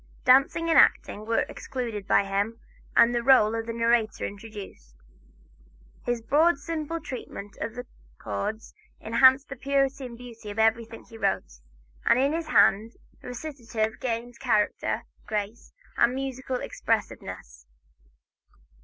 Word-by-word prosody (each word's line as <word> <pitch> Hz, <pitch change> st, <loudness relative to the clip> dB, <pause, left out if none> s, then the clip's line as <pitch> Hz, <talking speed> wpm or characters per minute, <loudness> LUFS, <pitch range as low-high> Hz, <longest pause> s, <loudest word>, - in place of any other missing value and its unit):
Dancing 275 Hz, +6 st, +4 dB
and 325 Hz, -, +5 dB
acting 215 Hz, +1 st, +3 dB
were 230 Hz, -, +1 dB
excluded 230 Hz, -6 st, -5 dB
by -, -, +4 dB
him, 200 Hz, +3 st, -2 dB, 0.4 s
and 235 Hz, +1 st, +6 dB
the 240 Hz, -, +1 dB
rôle 235 Hz, -3 st, +5 dB
of 225 Hz, -, -6 dB
narrator 230 Hz, -1 st, +1 dB
introduced. 200 Hz, -, -9 dB, 1.1 s
His 240 Hz, -2 st, -2 dB
broad, 305 Hz, +7 st, +3 dB
simple 325 Hz, +2 st, -4 dB
treatment 245 Hz, -8 st, -8 dB
of 225 Hz, +3 st, -4 dB, 0.4 s
chords 110 Hz, -, -4 dB, 0.3 s
enhanced 260 Hz, +4 st, +4 dB
the 275 Hz, -, -6 dB
purity 275 Hz, 0 st, 0 dB
and 235 Hz, -1 st, -11 dB
beauty 230 Hz, -3 st, -10 dB
of 205 Hz, -, -7 dB
everything 225 Hz, +1 st, +1 dB
he 225 Hz, -1 st, -14 dB
wrote, 60 Hz, -, -1 dB, 0.4 s
and -, -, +4 dB
in 275 Hz, +3 st, +2 dB
his 330 Hz, 0 st, -3 dB
hand 225 Hz, -5 st, +4 dB, 0.3 s
recitative 235 Hz, -5 st, -4 dB
gained 240 Hz, 0 st, -4 dB
character, 215 Hz, -5 st, 0 dB, 0.2 s
grace 210 Hz, +1 st, -4 dB, 0.3 s
and 245 Hz, +2 st, +3 dB
musical 260 Hz, -1 st, -4 dB
expressiveness. -, -, -4 dB
235 Hz, 125 wpm, -26 LUFS, 215-265 Hz, 1.1 s, and